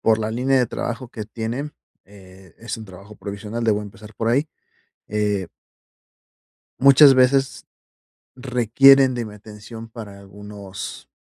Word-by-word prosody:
por 110 -1 +3
la 110 0 -2
línea 130 +3 +1
de 125 - +2
trabajo 120 +2 -5
que 110 -3 -7
tienen, 115 +7 -5 0.3
eh, 95 -2 -17
es 115 +1 -6
un 110 - -10
trabajo 100 +3 -13
provisional. 105 +3 -6
Debo 105 -2 +1
empezar 105 +1 -12
por 115 - -2
ahí, 140 +6 +1 0.6
eh 105 -3 -1 1.3
muchas 140 +1 +8
veces 135 +1 +2 0.7
requieren 130 +1 +4
de 120 -1 -3
mi 105 - -10
atención 105 +2 -11
para 110 -4 -10
algunos 100 0 -10
110 Hz, 135 wpm, -21 LUFS, 105-125 Hz, 1.3 s, muchas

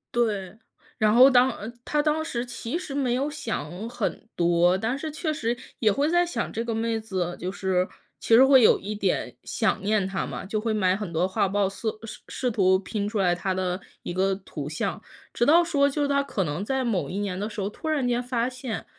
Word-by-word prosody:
对， 210 -4 0 0.4
然 215 -2 +3
后 255 +3 +8
当 255 0 +5
呃， 215 -2 -7
他 300 +3 +1
当 305 +1 +1
时 245 -6 -3
其 245 +3 -4
实 290 -6 -6
没 260 -4 +1
有 275 +3 0
想 220 - -5
很 240 -2 -3
多， 175 +1 +3
但 225 +6 -1
是 310 +2 -5
确 310 +1 -2
实 235 -3 -1 0.2
也 215 -2 +4
会 280 +8 +1
在 350 +1 +3
想 250 -9 -3
这 230 - -2
个 235 -1 -2
妹 225 0 0
子， 185 -5 -3
就 180 +2 -4
是， 190 -2 0 0.4
其 225 - +1
实 255 +4 +9
会 265 -1 +7
有 220 - +6
一 210 +2 -5
点 195 -3 -1
想 - - 0
念 205 -2 +1
她 195 0 -2
嘛， - - -6
就 215 +2 -2
会 225 0 0
买 190 -3 +2
很 210 -4 -5
多 175 +3 +1
画 200 0 0
报 200 0 +1
色 215 +3 -4
试 220 - -8
试 255 - -1
图 190 -4 +3
拼 200 +2 -3
出 215 - -2
来 180 -2 +3
她 190 +2 -2
的 185 0 -2 0.2
一 - - -4
个 190 +2 +1
图 155 -7 -7
像。 155 - -3 0.3
直 240 - +1
到 325 +4 +6
说， 285 -4 +3
就 295 +1 -2
是 285 - +2
他 280 0 +2
可 210 -9 -2
能 150 +6 -3
在 265 +4 -1
某 215 -6 -1
一 195 - -3
年 200 -3 -2
的 205 +3 -3
时 210 -1 -7
候， 195 - -1
突 315 +9 -6
然 285 -5 +1
间 245 0 0
发 245 -1 0
现， 255 -3 -5
220 Hz, 250 characters per minute, -26 LUFS, 190-255 Hz, 0.4 s, 实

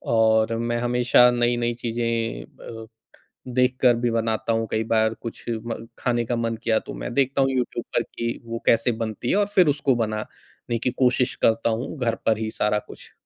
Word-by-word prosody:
और 110 0 +3
मैं 120 0 -1
हमेशा 125 0 +4
नई-नई 120 0 +1
चीज़ें 115 - -2
अ, 115 -1 -11 0.7
देखकर 125 -1 +3
भी 120 +1 0
बनाता 115 0 0
हूँ। 115 0 -1
कई 110 - 0
बार 110 0 +2
कुछ 115 - -7
म 115 0 -4
खाने 120 -1 0
का 120 - -1
मन 115 -1 -1
किया 110 -1 +2
तो - - -9
मैं - - -6
देखता 135 +1 +1
हूँ 135 - +3
यूट्यूब 130 -2 -2
पर - - +3
कि 115 0 -4
वो 115 0 -5
कैसे 115 +1 +3
बनती 110 +2 -4
है - - +3
और 205 -1 +2
फिर 180 -3 +6
उसको 140 -3 +1
बनाने 110 +1 -4
की 125 - 0
कोशिश 125 0 +1
करता 115 +1 +2
हूँ, 115 +7 -3
घर 115 -3 0
पर 110 -1 +3
ही 110 0 -3
सारा 105 0 0
कुछ। - - -13
115 Hz, 190 wpm, -24 LUFS, 115-125 Hz, 0.7 s, फिर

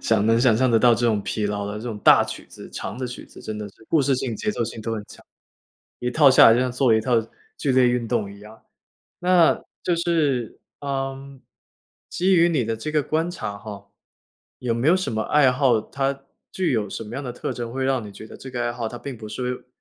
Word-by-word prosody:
想 110 -2 +2
能 115 +1 +4
想 120 -4 +4
像 130 0 +2
的 115 - +4
得 125 - +5
到 120 - +6
这 120 +2 0
种 105 -3 +1
疲 105 -2 -2
劳 100 0 -3
的 105 - -5
这 - - -9
种 110 -3 -5
大 - - +7
曲 - - -8
子， - - -12
长 100 - -6
的 130 - -3
曲 125 - -8
子， - - -15
真 110 -1 -6
的 105 -1 -6
是 110 - -20
故 160 - +3
事 135 -1 +2
性、 125 -4 -3
节 215 - -1
奏 120 - -2
性 115 0 -7
都 115 +1 -3
很 105 -1 -5
强。 - - -15 0.8
一 125 0 -1
套 140 +1 +6
下 130 - +8
来， 115 - +6
就 120 - +2
像 130 -1 0
做 125 -1 +2
了 110 - +5
一 - - 0
套 125 +2 0 0.4
剧 135 - 0
烈 125 -1 +5
运 120 -2 -1
动 105 -5 -1
一 100 - -14
样。 110 +1 -14 0.6
那 180 -2 +4 0.2
就 175 - +1
是， 150 -9 0 0.2
呃， 135 -1 -4 0.7
基 185 +2 +2
于 170 0 +5
你 145 -8 +1
的 115 0 -2
这 155 +7 -5
个 150 -2 +2
观 160 +4 -1
察 105 - -5
哈， 100 -2 -10 0.7
有 120 -2 -1
没 120 +5 +1
有 180 - +5
什 185 -11 -3
么 110 0 -1
爱 135 -1 +4
好， 125 -4 +3
它 135 +4 -3 0.3
具 185 -7 0
有 110 -4 0
什 115 - -5
么 110 +3 -9
样 140 - -4
的 125 - -4
特 - - -4
征， 120 -1 -6
会 130 0 -2
让 130 -4 0
你 - - -9
觉 110 - -11
得 - - -11
这 130 - -10
个 120 -1 -3
爱 120 - -1
好， 120 -2 -4
它 120 +1 -8
并 135 -4 -7
不 110 -1 -9
是 125 +2 -4
125 Hz, 275 characters per minute, -23 LUFS, 110-135 Hz, 0.8 s, 下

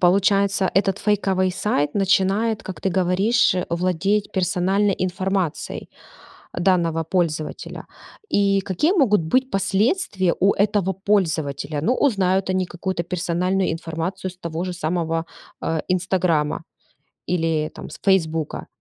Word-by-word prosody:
получается, 195 +1 +3
этот 195 0 +2
фейковый 195 -3 +1
сайт 180 -6 -1
начинает, 200 +3 +2
как 185 -5 -7
ты - - 0
говоришь, 190 +4 +2
владеть 185 +4 0
персональной 190 +2 +1
информацией 185 -2 -2 0.7
данного 175 -3 +1
пользователя. 160 -2 -2 0.4
И 200 -1 +3
какие 190 - +1
могут 235 - +3
быть 255 +11 +1
последствия 195 - +1
у 195 +2 +4
этого 200 -2 +1
пользователя? 160 -7 -1
Ну, 245 +10 +2
узнают 195 -8 +1
они 185 0 +1
какую-то 175 0 -3
персональную 180 +2 0
информацию 165 +3 -4
с 180 - -18
того 170 -1 -4
же 185 -1 -3
самого, 165 -1 -1 0.4
э, 160 -1 -1
"Инстаграма" 180 -4 0 0.6
или, 160 -3 0
там, - - -9
с - - -10
"Фесбука". 165 -5 0
185 Hz, 120 wpm, -22 LUFS, 170-195 Hz, 0.7 s, у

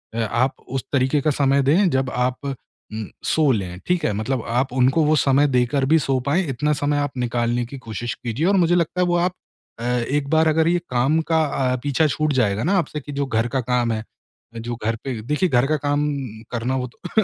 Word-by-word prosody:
अ, 115 - -2
आप 115 +4 0
उस 135 0 -3
तरीके 135 +2 +2
का 155 - +2
समय 140 0 +2
दें 175 +8 +4
जब 130 -1 0
आप 125 +1 0
उम, 110 -5 -7 0.2
सो 155 -3 +2
लें। 90 -4 -4
ठीक 175 -3 +1
है? - - +1
मतलब 110 +4 -2
आप 125 +2 0
उनको 130 +5 +3
वो 155 - +3
समय 140 0 +3
देकर 130 +1 +1
भी 160 +3 +4
सो 135 -2 0
पाएँ, 175 +7 +2
इतना 150 +4 0
समय 145 +1 0
आप 145 -2 -3
निकालने 120 0 0
की 135 +4 -9
कोशिश 115 0 -5
कीजिए 120 +7 -3
और 200 - +3
मुझे 175 -1 +3
लगता 175 +1 0
है 180 - +3
वो 175 - +1
आप 180 +1 +1 0.5
अ, - - -6
एक 125 +4 0
बार 160 0 +3
अगर 160 +1 +3
ये 175 +1 +2
काम 130 +6 +2
का 160 -1 +4
अ, 130 -3 0
पीछा 145 +2 +2
छूट 155 +1 0
जाएगा 110 -5 +1
ना 190 +5 +2
आपसे 155 -3 -1
कि 145 - -9
जो 140 0 -1
घर 115 -2 0
का 130 +1 -1
काम 120 -1 0
है, 110 0 -3 0.5
जो 120 +1 -4
घर 115 0 +1
पे 130 -5 -4
देखिए 150 - 0
घर 125 -1 +3
का 155 - +1
काम 145 +1 +1 0.4
करना 125 +2 -1
वो 125 -1 -2
तो 180 - -1
135 Hz, 225 wpm, -22 LUFS, 120-150 Hz, 0.5 s, दें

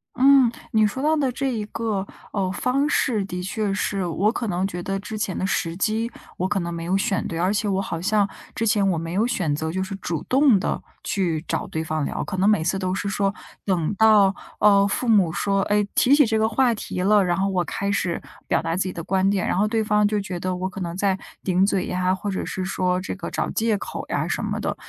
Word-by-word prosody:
嗯， 265 -2 +6 0.2
你 220 -1 +4
说 235 +6 -2
到 310 +2 +3
的 275 -4 +1
这 275 - -3
一 220 -2 -2
个， 210 -4 -2 0.3
呃， 190 -3 0
方 265 +8 0
式 220 -10 +1
的 180 -1 -5
确 200 +1 -2
是 195 -2 -1
我 190 +6 +1
可 235 -2 -3
能 185 0 0
觉 175 -2 -6
得 195 +1 -2
之 215 +2 -6
前 200 -3 -2
的 190 - -1
时 165 -3 -1
机， 225 +4 0 0.3
我 185 - 0
可 205 - +1
能 170 -1 -3
没 165 - -5
有 185 +3 +1
选 195 -2 0
对， 165 - -4
而 185 +3 +2
且 210 0 0
我 195 0 +1
好 165 -4 -4
像 205 +2 +2 0.3
之 225 - -1
前 205 -2 +3
我 170 - 0
没 165 +1 -4
有 205 +5 +2
选 175 -11 0
择 160 +1 -3
就 190 +2 -2
是 190 +1 -4
主 175 -5 -3
动 265 -5 +4
地 - - -2 0.2
去 170 -6 -1
找 - - -1
对 160 - -3
方 155 -1 -2
聊， - - -3
可 200 - -4
能 195 +3 +3
每 210 -7 +3
次 185 +4 0
都 185 -1 -1
是 200 - -2
说 195 0 0 0.3
等 180 -2 0
到， 210 -3 +5 0.2
呃， 200 -1 +5
父 220 +5 -1
母 200 -7 +4
说， 195 +3 0
诶， 205 0 +1
提 260 - +4
起 290 0 +6
这 220 -1 +1
个 220 0 +2
话 245 +1 +3
题 180 - -4
了， 205 +1 +4
然 175 0 0
后 195 +1 +1
我 185 -2 0
开 200 +4 -3
始 185 -4 -1 0.3
表 - - +2
达 165 0 -2
自 185 - +1
己 185 - -3
的 170 - -6
观 190 0 +1
点， 200 -2 0
然 - - 0
后 205 - +3
对 220 +1 0
方 210 -1 +2
就 210 0 +1
觉 190 -3 -4
得 185 +1 -2
我 185 +1 -2
可 195 0 -8
能 170 -1 -4
在 195 -1 +1 0.2
顶 185 0 +2
嘴 195 -2 0
呀， 185 0 +1
或 200 +2 -3
者 190 - -2
是 185 - -3
说 180 -1 0
这 185 - -5
个 200 - -6
找 - - -1
借 220 -1 +1
口 - - -6
呀 - - -1
什 - - -2
么 - - -2
的。 - - -2
195 Hz, 270 characters per minute, -23 LUFS, 185-215 Hz, 0.3 s, 嗯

